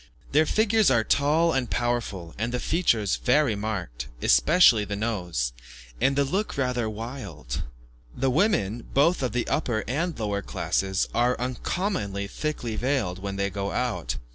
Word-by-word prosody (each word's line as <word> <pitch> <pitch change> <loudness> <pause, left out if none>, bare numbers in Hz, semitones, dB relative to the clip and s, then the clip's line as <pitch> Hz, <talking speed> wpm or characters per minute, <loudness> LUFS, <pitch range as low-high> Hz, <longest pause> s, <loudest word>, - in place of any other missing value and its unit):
Their 155 +2 +4
figures 220 0 +3
are 120 -4 +3
tall 155 +7 +2
and 130 -3 0
powerful, 115 -8 -2
the 120 +3 -2
features 115 - +1
very 130 -3 +2
marked 90 - -4
especially 155 - +5
the 100 0 -4
nose 90 - -2 0.5
and 135 - +3
the 140 - +3
look 190 +8 -2
rather 125 -4 0
wild. 105 - -6 0.6
The 135 0 +1
women, 120 - +1
both 150 +5 +4
of 125 -3 0
the 120 +2 -1
upper 120 -7 0
and 160 +7 -1
lower 100 -2 -1
classes, 95 -1 -1
are 120 +1 +2
uncommonly 125 - -2
thickly 120 0 -3
veiled 115 -8 -1
when 100 0 -4
they 100 0 -1
go 100 +1 -3
out. 125 - -1
120 Hz, 145 wpm, -26 LUFS, 100-140 Hz, 0.6 s, especially